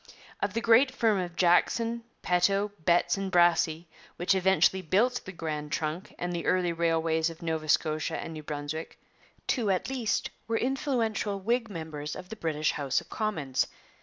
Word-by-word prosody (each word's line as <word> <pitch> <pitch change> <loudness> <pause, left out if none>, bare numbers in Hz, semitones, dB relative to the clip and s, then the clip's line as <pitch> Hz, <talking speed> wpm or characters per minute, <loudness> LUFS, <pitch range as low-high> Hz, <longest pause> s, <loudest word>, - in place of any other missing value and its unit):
Of 200 +1 -2
the 230 - +1
great 230 +4 +5
firm 225 -6 +1
of 175 -1 -4
Jackson, 230 +7 +2 0.2
Peto, 195 +3 +2
Betts, 175 +3 +3
and 195 -1 -3
Brassey, 170 -2 +3 0.3
which 175 +3 +2
eventually 190 0 +3
built 215 +9 +2
the 190 - -6
Grand 150 -4 -4
Trunk 155 +4 -3
and 175 0 -3
the 170 - -3
early 180 -2 +2
railways 165 -1 +1
of 165 0 -11
Nova 160 -2 -2
Scotia 155 +1 +1
and 165 - -6
New 155 - -7
Brunswick, 150 +1 -5 0.5
two 230 -6 0
at 190 +6 0
least 245 -5 -1 0.2
were 225 0 +1
influential 235 -6 -1
Whig 230 +3 0
members 160 -5 -5
of 180 - -9
the 220 - -6
British 155 -6 0
House 140 -3 0
of - - -14
Commons. 155 - -1
180 Hz, 165 wpm, -29 LUFS, 160-215 Hz, 0.5 s, great